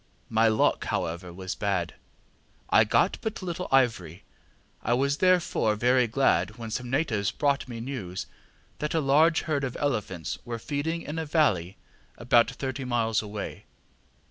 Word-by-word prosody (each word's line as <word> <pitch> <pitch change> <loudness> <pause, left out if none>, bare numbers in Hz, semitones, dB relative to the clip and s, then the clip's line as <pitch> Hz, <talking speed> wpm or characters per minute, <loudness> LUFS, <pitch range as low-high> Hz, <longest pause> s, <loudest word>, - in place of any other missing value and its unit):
My 110 0 +4
luck, 110 -1 +2
however, 85 +2 -3
was 95 +1 -5
bad; 100 -5 -1 0.8
I - - +7
got - - +2
but 220 -3 -4
little 180 0 -4
ivory. 110 -10 +1 0.6
I 120 - +1
was 140 +3 +1
therefore 180 - +2
very 125 +3 +3
glad 110 -4 +1
when 115 -2 -7
some 125 +2 -3
natives 120 -8 0
brought 140 +4 0
me 120 -2 -7
news 115 -8 -5 0.5
that 150 +2 -2
a - - +3
large 155 +4 +4
herd 150 -4 -1
of 130 -2 -3
elephants 105 - -2
were 120 -1 -4
feeding 155 +7 -3
in 155 +2 -4
a 160 - -3
valley 100 - +1 0.4
about 120 0 +4
thirty 135 0 -4
miles 115 -3 +1
away. 105 -1 -7
120 Hz, 150 wpm, -27 LUFS, 105-145 Hz, 0.8 s, I